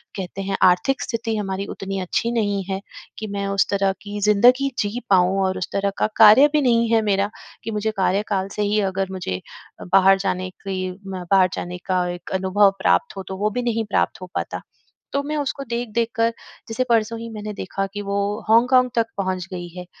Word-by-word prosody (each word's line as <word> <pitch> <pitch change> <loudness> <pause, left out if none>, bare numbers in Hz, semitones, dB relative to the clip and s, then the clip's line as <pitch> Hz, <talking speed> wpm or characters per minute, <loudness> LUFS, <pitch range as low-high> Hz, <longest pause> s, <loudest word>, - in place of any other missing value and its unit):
कहते 190 0 -5
हैं 195 0 -2
आर्थिक 185 +9 +3
स्थिति 225 -1 -2
हमारी 195 -1 -3
उतनी 195 0 -5
अच्छी 230 +6 -1
नहीं 205 -4 0
है 190 0 -1 0.4
कि 215 - -5
मैं 200 0 -3
उस 195 0 +1
तरह 195 -1 +2
की 205 0 -6
ज़िंदगी 245 +7 +4
जी 210 +4 -1
पाऊँ 190 0 +4
और 185 0 0
उस 185 - -3
तरह 200 0 +1
का - - +2
कार्य 220 +6 +8
भी 300 - +3
नहीं 235 -3 +3
है 225 - +4
मेरा 200 -1 +1 0.3
कि 225 - -4
मुझे 215 +1 -1
कार्यकाल 195 0 0
से 210 - -2
ही 210 +1 +1
अगर 190 0 -3
मुझे 95 - -4 0.5
बाहर 195 0 +6
जाने 185 -1 -2 0.2
की 185 -1 -2 0.2
बाहर 185 0 +2
जाने 180 +1 -5
का 185 -1 +1
एक 175 0 -7
अनुभव 190 +1 +3
प्राप्त 90 - +2
हो 190 - -4
तो 190 - -5
वो 210 +2 +1
भी 245 +4 -2
नहीं 225 -2 0
प्राप्त 205 - -1
हो 185 - -7
पाता। - - -3 0.5
तो 280 0 0
मैं 300 +1 -3
उसको 280 -1 -2
देख-देख 235 -1 -1
कर 230 0 +3 0.4
जैसे 240 +3 0
परसों 230 0 +1
ही 230 0 -7
मैंने 210 -1 -6
देखा 195 0 -3
कि 205 - -4
वो 200 0 -2 0.3
हॉन्गकॉन्ग 250 +2 +5
तक 230 -1 +3
पहुँच 185 -2 -2
गई 175 -1 -5
है। 180 - -6
200 Hz, 200 wpm, -22 LUFS, 190-225 Hz, 0.5 s, कार्य